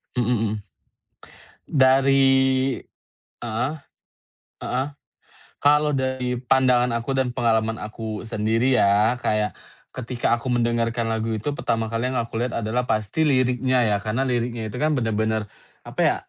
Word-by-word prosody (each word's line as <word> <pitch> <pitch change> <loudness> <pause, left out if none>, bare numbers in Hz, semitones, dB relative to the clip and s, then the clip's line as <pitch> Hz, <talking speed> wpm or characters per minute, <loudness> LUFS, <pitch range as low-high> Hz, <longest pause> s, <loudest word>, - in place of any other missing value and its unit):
Mmm 120 -3 0 0.2
mmm. 105 -1 -3 1.0
Dari 135 -1 +3 0.7
heeh, 120 +4 -2 0.9
heeh. 130 +2 -1 0.8
Kalau 150 +1 +4
dari 130 -2 -1
pandangan 125 -1 +3
aku 115 +3 -3
dan 130 -2 +1
pengalaman 115 -1 +1
aku 110 0 -6
sendiri 115 +3 +1
ya 105 +3 +4
kayak, 105 -2 -1 0.4
ketika 125 -1 -1
aku 125 +2 -5
mendengarkan 115 -1 0
lagu 110 0 -1
itu 120 +8 -3
pertama 115 -1 -1
kali 115 +3 -1
yang 130 - -2
aku 115 0 -6
lihat 125 0 -2
adalah 120 +3 -1
pasti 110 +8 0
liriknya 130 -2 +2
ya. 105 -1 +2
Karena 110 +5 -1
liriknya 120 -3 -2
itu 110 - -7
kan 155 0 +2
bener-bener 110 -2 0 0.4
apa - - -9
ya, - - +3
120 Hz, 135 wpm, -23 LUFS, 110-130 Hz, 1.0 s, Kalau